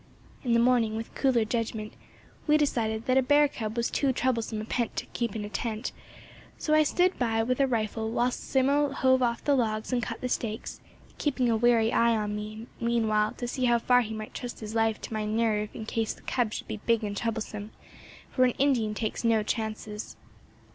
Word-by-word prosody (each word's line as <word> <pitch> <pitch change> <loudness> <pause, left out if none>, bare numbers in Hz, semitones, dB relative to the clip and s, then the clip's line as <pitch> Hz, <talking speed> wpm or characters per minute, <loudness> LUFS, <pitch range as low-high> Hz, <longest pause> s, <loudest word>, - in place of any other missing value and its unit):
In 240 -3 +1
the 235 - +5
morning, 235 -2 +3
with 225 +1 -5
cooler 250 -5 +2
judgment, 220 -1 -3 0.5
we 300 0 +5
decided 225 -7 0
that 255 +1 +4
a - - +4
bear 290 +3 +5
cub 220 -4 -5
was 235 - 0
too 275 -2 +2
troublesome 235 -4 -1
a 215 - -4
pet 235 +1 -2
to - - -3
keep 235 -3 -2
in 210 -1 -3
a - - -5
tent; 220 +1 -3 0.7
so 310 - 0
I 310 - +6
stood 360 +5 +2
by 225 -2 +1
with 255 +3 -1
a 275 - +4
rifle 220 -2 -1
while 240 +2 +1
Simmo 280 +3 +1
hove 260 -1 +3
off 235 -1 0
the 290 - +3
logs 220 -1 -1
and 245 - +2
cut 210 - -4
the 255 - -2
stakes, 225 -3 -3 0.4
keeping 260 -5 +1
a - - +3
wary 230 0 +3
eye 235 -1 +4
on 210 -1 -2
me, 215 +2 -6
meanwhile, 220 -2 +1
to 245 - -5
see 255 +1 -1
how 240 -1 +4
far 245 +1 +4
he 220 -2 -4
might 215 0 -7
trust 245 -1 -6
his 215 -1 -6
life 225 -1 +1
to - - -6
my 215 0 -1
nerve 215 -1 0
in 220 - -6
case 225 0 -1
the - - -20
cub 240 -4 0
should - - -5
be - - -4
big 230 -1 +3
and 205 -1 -3
troublesome; 215 -1 -3 0.6
for 255 - +3
an 250 -1 +3
Indian 245 -6 +2
takes 220 +2 -3
no 225 -2 +3
chances. 215 -1 -4
230 Hz, 210 wpm, -28 LUFS, 220-250 Hz, 0.7 s, I